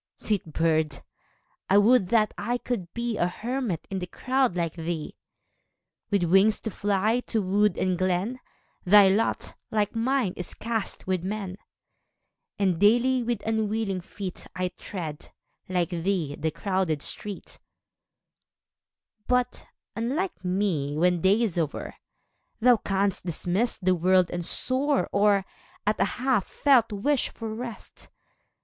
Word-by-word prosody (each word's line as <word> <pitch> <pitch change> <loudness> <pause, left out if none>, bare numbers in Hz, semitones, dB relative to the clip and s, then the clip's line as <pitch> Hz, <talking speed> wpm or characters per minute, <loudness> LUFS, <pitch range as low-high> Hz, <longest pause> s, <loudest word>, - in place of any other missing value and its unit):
a - - -5
(89) - - -1
Sweet 195 -7 -1
bird! 160 -3 +1 0.7
I 195 - +5
would 205 -2 +5
that 215 -2 +3
I 245 +1 -1
could 225 -9 -4
be 235 -2 -2
A 175 - +2
hermit 230 - -3
in 190 - -2
the 180 - -5
crowd 255 0 0
like 165 -2 -1
thee! 165 -2 -4 0.9
With 200 -4 +2
wings 195 +5 +4
to 220 - -4
fly 205 +4 +1
to 225 - +1
wood 205 +2 +2
and 185 -1 0
glen, 185 +7 0 0.4
Thy 200 +1 +7
lot, 210 +4 0 0.2
like 210 0 0
mine, 235 -4 +1
is 180 - -5
.cast 225 -2 -3
with 185 -2 -1
men; 195 -1 -4 1.0
And 185 -5 +1
daily, 245 +5 +4
with 235 -3 -2
unwilling 220 -3 -1
feet, 185 0 -7
1 180 0 -1
tread, 160 -6 -6 0.4
like 180 -2 0
thee, 170 -3 -1
the 160 +2 -1
crowded 165 -2 -1
street; 205 -3 -4 1.7
But, 250 0 0 0.3
unlike 275 - -2
me, 180 -6 0
when 175 +1 +2
day 200 +6 +4
is 185 -6 0
o'er. 155 -3 -3 0.7
Thou 245 0 +5
canst 195 -1 -1
dismiss 180 +7 0
the 185 -1 +2
world 185 +1 +3
and 175 0 -3
soar, 265 - +1
Or, 200 -1 +3 0.4
at 210 +1 +1
a 195 - +4
half 250 -5 +1
felt 255 -6 +3
wish 250 +7 0
for 225 -1 -6
rest. 235 0 -8
200 Hz, 140 wpm, -26 LUFS, 180-230 Hz, 1.7 s, Thy